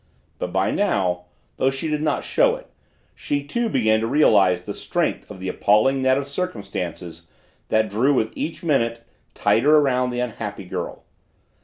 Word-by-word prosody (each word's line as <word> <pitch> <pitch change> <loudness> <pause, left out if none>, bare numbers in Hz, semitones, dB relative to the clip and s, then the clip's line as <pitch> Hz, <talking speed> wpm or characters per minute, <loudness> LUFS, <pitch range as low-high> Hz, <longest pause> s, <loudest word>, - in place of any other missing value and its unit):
But 90 - -3
by 95 +1 +1
now, 95 - 0 0.3
though 130 - +2
she 135 +4 -3
did 150 -1 -1
not 150 -2 0
show - - +2
it, - - -11 0.5
she 145 -1 -2
too 235 +10 -2
began 110 - +2
to 115 - -1
realize 100 -10 +4
the - - -5
strength - - -2
of 100 -3 -9
the 95 - -5
appalling 110 +8 +2
net 130 0 +3
of 140 0 -3
circumstances 95 - -5 0.4
that 110 0 +2
drew 120 +8 +2
with 110 -3 0
each 165 - -4
minute 115 -7 0 0.3
tighter 115 +10 +4
around 125 -3 +2
the 125 0 -3
unhappy 110 -5 -4
girl. 90 - -5
115 Hz, 165 wpm, -22 LUFS, 100-140 Hz, 0.5 s, realize